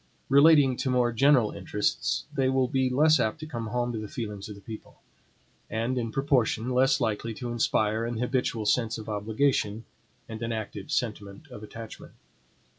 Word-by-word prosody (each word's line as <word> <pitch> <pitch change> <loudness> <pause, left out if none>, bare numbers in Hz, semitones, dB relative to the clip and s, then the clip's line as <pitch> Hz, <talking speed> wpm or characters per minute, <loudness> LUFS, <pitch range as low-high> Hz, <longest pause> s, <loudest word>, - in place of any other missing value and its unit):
Relating 140 -1 +6
to 130 - -2
more 125 -1 +2
general 130 -2 +4
interests, 100 +2 -1
they 135 -3 +1
will 130 -1 +2
be 130 0 +1
less 155 +5 +4
apt 110 +8 0
to 155 - -6
come 120 -7 -5
home 120 +2 -1
to 110 - -3
the 110 - -6
feelings 105 -3 -6
of 105 - -7
the 100 - -14
people; 110 +1 -10 0.7
and, 115 +4 -1
in 115 -3 -2
proportion, 125 -3 +1
less 135 +2 +3
likely 115 -1 -2
to 120 0 -5
inspire 110 -1 +1
an 115 0 -3
habitual 125 -2 -1
sense 115 +1 +1
of 110 - -9
obligation, 110 +1 0 0.4
and 110 0 -8
an 115 0 -2
active 110 -3 -5
sentiment 105 +3 -3
of 125 -5 -10
attachment. 110 +1 -10
115 Hz, 175 wpm, -27 LUFS, 110-130 Hz, 0.7 s, Relating